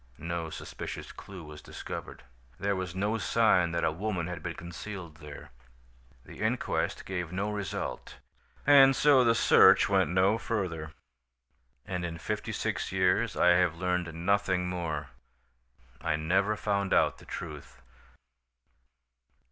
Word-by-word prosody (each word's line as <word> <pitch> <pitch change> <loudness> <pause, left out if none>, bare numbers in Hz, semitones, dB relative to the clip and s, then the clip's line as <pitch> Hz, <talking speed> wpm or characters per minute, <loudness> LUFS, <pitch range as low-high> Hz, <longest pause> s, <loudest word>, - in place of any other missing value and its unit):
No 85 0 -4
suspicious - - -7
clue 95 -3 -10
was 75 -1 -11
discovered. - - -8 0.4
"There 100 0 0
was 95 -1 -4
no 105 +4 0
sign 100 -6 +3
that 85 - -1
a - - +2
woman 95 0 -2
had 90 0 -6
been 85 -1 -5
concealed 85 -1 -8
there. 75 -2 -11 0.7
"The - - -12
inquest - - -1
gave 90 -3 -4
no 100 +3 -2
result, 105 -2 -5 0.5
and 135 -2 +7
so 140 -3 +5
the 115 -1 +4
search - - +6
went 95 -5 +3
no 95 +5 +3
further. 85 -10 -3 0.9
"And 90 -1 -3
in 85 -1 -4
fifty 80 - -4
six - - -2
years - - +1
I 90 - +5
have 90 -2 +4
learned 90 -1 -1
nothing 95 +1 +1
more. 85 -5 -3 0.9
I 75 - 0
never 95 +7 +1
found 100 -2 0
out - - +2
the - - -15
truth." - - -8
90 Hz, 135 wpm, -29 LUFS, 85-100 Hz, 0.9 s, and